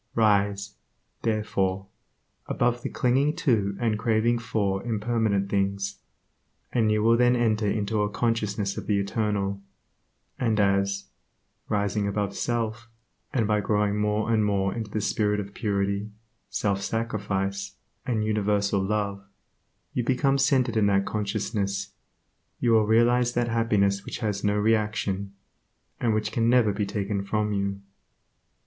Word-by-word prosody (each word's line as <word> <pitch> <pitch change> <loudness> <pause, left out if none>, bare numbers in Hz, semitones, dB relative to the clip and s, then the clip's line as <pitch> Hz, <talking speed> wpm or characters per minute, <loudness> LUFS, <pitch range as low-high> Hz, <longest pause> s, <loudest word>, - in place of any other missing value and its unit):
Rise, 100 -2 +2 0.4
therefore, 100 -4 0 0.6
above 120 0 0
the - - -3
clinging 135 +5 +1
to 100 -8 +1
and 115 -2 +1
the - - -1
craving 115 +1 +2
for 100 -4 -1
impermanent 110 -3 0
things, 100 0 -1 0.7
and 110 -3 +2
you 105 0 +2
will 115 +1 +5
then 125 +1 +4
enter 110 -3 +1
into 105 +1 0
a 105 - +1
consciousness 105 -3 -1
of - - -9
the 105 - +2
Eternal, 100 -1 -1 0.8
and 110 -3 +1
as, 100 0 +1 0.6
rising 100 0 0
above 100 0 -2
self, 115 -1 -2 0.4
and 120 -6 +1
by 105 0 +1
growing 105 0 +1
more 105 +2 +1
and 110 -1 +3
more 100 -2 +1
into 110 -3 -5
the 105 +1 -2
spirit 105 0 +1
of 100 -1 -6
purity, 100 -1 -1 0.4
self 100 -2 -1
sacrifice 100 -3 -2 0.3
and 115 -4 -1
universal 105 -2 +1
Love, 100 0 -1 0.7
you 125 - 0
become 135 +3 +2
centered 135 -4 +2
in 105 -2 +3
that 100 -1 +2
consciousness, 100 -1 -2 0.7
you 120 - +2
will 110 -2 +4
realize 120 +2 +3
that 120 0 0
happiness 100 -4 +1
which - - -6
has 105 -4 -2
no 105 0 +2
reaction, 105 -2 0 0.6
and 115 -3 +1
which 110 0 -1
can 115 0 +1
never 120 -4 +4
be 100 0 -2
taken 100 0 -2
from 105 +1 -1
you. 100 0 -2
105 Hz, 140 wpm, -26 LUFS, 100-115 Hz, 0.8 s, will